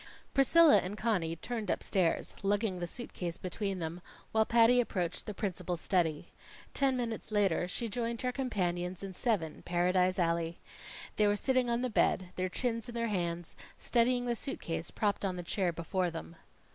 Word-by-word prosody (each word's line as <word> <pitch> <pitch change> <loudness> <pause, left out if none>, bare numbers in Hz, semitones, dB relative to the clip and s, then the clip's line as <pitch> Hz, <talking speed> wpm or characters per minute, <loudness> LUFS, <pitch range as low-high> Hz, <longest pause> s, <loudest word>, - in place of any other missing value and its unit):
Priscilla 300 +3 +7
and 195 +3 -4
Conny 185 -8 0
turned 220 +3 -4
upstairs 180 -4 0
lugging 200 -1 0
the 175 - -3
suit 240 +7 -7
case 175 -1 -4
between 195 +1 -3
them, 170 +1 -4 0.3
while 220 0 +3
Patty 235 +1 +6
approached 180 -7 -2
the 210 - -3
principal's 180 -3 -3
study. 165 -6 0 0.4
Ten 270 -2 +2
minutes 230 -3 -4
later 195 -5 +2
she 230 +6 -3
joined 230 +2 -3
her 250 - +1
companions 185 -8 -2
in 195 -1 -5
Seven, 185 - -1
Paradise 180 +1 +2
Alley. 170 -1 0 0.6
They 210 - +4
were 205 - +3
sitting 255 +2 +1
on 235 +1 0
the 255 - 0
bed, 185 -3 +2
their 185 0 -1
chins 230 +2 -2
in 240 - -7
their 230 -1 0
hands, 175 -3 -2 0.2
studying 245 +1 +2
the 240 -1 0
suit 270 +4 -4
case 165 0 -3
propped 205 -2 -1
on 185 -2 -1
a 175 - -4
chair 180 +1 0
before 175 +2 -1
them. 165 0 -8
195 Hz, 175 wpm, -32 LUFS, 175-235 Hz, 0.6 s, Priscilla